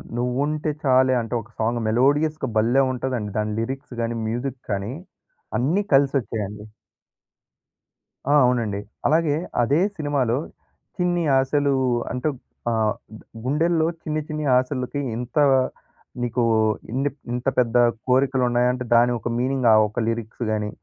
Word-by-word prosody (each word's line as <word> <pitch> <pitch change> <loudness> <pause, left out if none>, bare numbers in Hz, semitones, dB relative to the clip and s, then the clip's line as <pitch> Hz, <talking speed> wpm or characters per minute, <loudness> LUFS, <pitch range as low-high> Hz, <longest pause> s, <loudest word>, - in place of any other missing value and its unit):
'నువ్వుంటే 145 +6 -1
చాలే' 130 -1 +4
అంటే 115 +2 -6
ఒక 115 - -17
సాంగ్ 115 +2 0
మెలోడియస్‌గా 145 +5 +2
భల్లే! 120 +5 +3
ఉంటదండి. 125 -5 -3
దాని 105 0 -1
లిరిక్స్ 135 +2 -5
గాని, 115 0 -2
మ్యూజిక్ 120 +3 -3
కానీ 100 +3 -2 0.7
అన్నీ 155 +11 +1
కలిసొచ్చాయండి. 110 -7 0 1.6
ఆ! - - +3
అవునండి. 115 -5 0 0.3
అలాగే 155 -1 +2 0.3
అదే 140 +7 +2 0.2
సినిమాలో 140 -5 0 0.6
చిన్ని‌ 175 -1 +1 0.2
ఆశలు 140 +1 +1 0.4
అంటే 125 +4 -1 0.4
ఆహ్, 110 -1 +1 0.2
గు - - -18 0.2
గుండెల్లో 160 +4 +1 0.2
చిన్ని 155 0 -2
చిన్ని 155 -1 -3
ఆశలకి 130 +1 -2 0.2
ఎంత 120 +3 -6 0.8
నీకు 120 0 0 0.5
ఇన్ని 135 +3 0 0.2
ఇంత 125 +2 -4
పెద్ద 120 -1 +1 0.3
కోరికలు 130 0 +2
ఉన్నాయాంటే, 125 +1 +1
దాని 120 +1 +5
ఒక 115 - -5
మీనింగ్ 130 0 0
ఆ - - +7
ఒక్క 105 - -5
లిరిక్స్‌ 115 +1 -3
గాని, 105 -1 -1
125 Hz, 125 wpm, -23 LUFS, 115-145 Hz, 1.6 s, ఆ